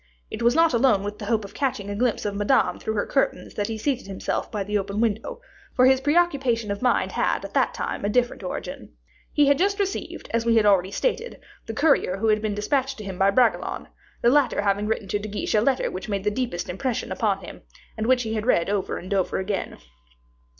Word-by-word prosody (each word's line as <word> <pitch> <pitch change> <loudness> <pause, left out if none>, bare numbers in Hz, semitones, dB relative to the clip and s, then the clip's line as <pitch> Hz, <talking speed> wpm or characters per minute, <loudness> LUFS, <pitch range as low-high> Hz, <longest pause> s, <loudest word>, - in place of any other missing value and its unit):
It - - -5
was 235 +2 +3
not 330 -3 +4
alone 235 -5 +3
with 205 +1 -5
the 205 - -6
hope 220 -2 +1
of 200 - -11
catching 250 -8 -2
a 200 - -4
glimpse 235 0 0
of 205 - -1
Madame 205 +6 +2
through 220 - -3
her 205 - 0
curtains 270 - -1
that 205 -1 -2
he 225 - -4
seated 260 0 -2
himself 195 -1 -3
by 210 -3 -2
the 210 +2 -4
open 200 0 -1
window 225 - -1 0.4
for 255 - +5
his 260 0 +5
preoccupation 275 -8 +1
of 200 - -4
mind 250 - +2
had - - 0
at - - -9
that - - +1
time - - -4
a 205 - 0
different 245 +1 +1
origin. 185 - -6 0.4
He 295 - +4
had 280 0 +3
just 400 +2 +2
received, 395 -1 -3
as 230 0 +1
we 230 0 +2
have 220 -2 +4
already 190 -3 +4
stated, 475 - -2 0.3
the 225 - -5
courier 280 - +2
who 220 +3 +1
had 215 0 +3
been 215 -2 -2
dispatched 265 +6 -1
to 215 - -7
him 190 -2 -7
by 195 +1 +5
Bragelonne, 240 +3 +1 0.3
the 235 - +5
latter 265 -7 +2
having 200 +1 +1
written 220 -2 -2
to 205 - 0
De 215 +1 -6
Guiche 205 - -3
a 210 - +4
letter 260 +3 +1
which 185 - -6
had - - -5
made 200 -1 -1
the 210 - +1
deepest 205 -7 -3
impression 225 +7 -3
upon - - 0
him, - - -10 0.3
and 220 0 -2
which 255 -1 +3
he 220 -1 -3
had 215 +1 -2
read 175 -5 +2
over 200 -2 -1
and 185 +3 -5
over 190 -2 0
again. 190 +1 -3
220 Hz, 235 wpm, -24 LUFS, 200-255 Hz, 0.4 s, for